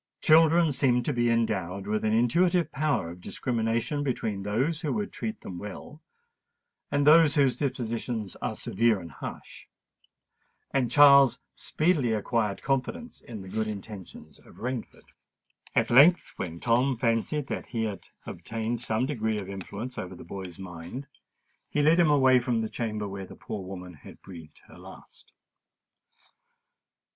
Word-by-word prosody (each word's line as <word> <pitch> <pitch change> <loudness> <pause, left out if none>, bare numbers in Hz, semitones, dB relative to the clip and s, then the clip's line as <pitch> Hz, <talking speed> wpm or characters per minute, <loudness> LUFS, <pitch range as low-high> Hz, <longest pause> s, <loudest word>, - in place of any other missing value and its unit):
Children 165 +1 +5
seem 125 -3 +2
to 145 - -1
be 120 -1 +1
endowed 100 -5 -1
with 105 +1 -1
an 110 - +1
intuitive 170 +11 +2
power 145 - -1
of 90 +1 -12
discrimination 115 +6 -2
between 115 -7 -2
those 130 +11 -1
who 150 - -2
would 210 -1 -3
treat 220 0 -5
them 90 -2 -7
well, 105 - -9 0.9
and 145 0 +1
those 155 0 +6
whose 135 -5 +3
dispositions 115 -6 -3
are - - -2
severe 115 0 +1
and 85 -2 -10
harsh; - - -9 1.0
and 130 -3 +1
Charles 140 0 +7 0.2
speedily 155 -8 +1
acquired 105 -1 -1
confidence 135 - -2
in 110 -4 -9
the - - -11
good 110 +3 -2
intentions 105 -2 -9
of - - -18
Rainford. 125 -1 -5 0.7
At - - +2
length, 150 +9 +6
when 85 -2 -5
Tom 125 +4 +2
fancied 115 +5 0
that - - -4
he 115 -2 -2
had 105 -4 -5 0.2
obtained 115 +1 -4
some 115 +1 0
degree 110 -6 -1
of 100 -2 -5
influence 100 +6 -6
over 90 0 -6
the - - -11
boy's 90 -1 -8
mind, 90 +8 -8 0.6
he 145 - 0
led 160 +4 +5
him 170 -3 +5
away 130 -3 +5
from 120 -2 -1
the 110 - -3
chamber 110 -3 -3
where 95 -1 -7
the - - -12
poor 100 -3 -6
woman 90 -1 -8
had 75 - -14
breathed 85 -5 -12
her - - -16
last. - - -14
115 Hz, 150 wpm, -27 LUFS, 105-140 Hz, 1.0 s, Charles